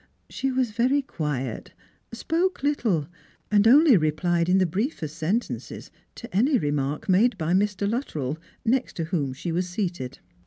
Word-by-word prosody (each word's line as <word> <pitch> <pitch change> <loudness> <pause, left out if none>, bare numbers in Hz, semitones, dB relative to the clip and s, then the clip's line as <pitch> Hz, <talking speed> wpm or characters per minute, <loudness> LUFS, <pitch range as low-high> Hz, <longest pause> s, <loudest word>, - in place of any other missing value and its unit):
She 270 0 -1
was 255 -3 0
very 255 +6 +2
quiet, 140 - -4 0.4
spoke 330 +9 -1
little, 225 - +1 0.4
and 210 +1 +5
only 285 +2 +7
replied 170 +2 +1
in 185 - +4
the 190 - +3
briefest 180 - -3
sentences 200 +10 -3 0.2
to 235 -5 -10
any 260 +7 +4
remark 145 - -2
made 205 +5 +3
by 165 0 -1
Mr. 200 +1 +1
Luttrell, 160 - -3 0.3
next 255 +3 0
to 165 - -2
whom 160 -5 -1
she 140 +6 -5
w^is 180 +2 0
seated. 175 - -4
190 Hz, 150 wpm, -25 LUFS, 155-245 Hz, 0.4 s, only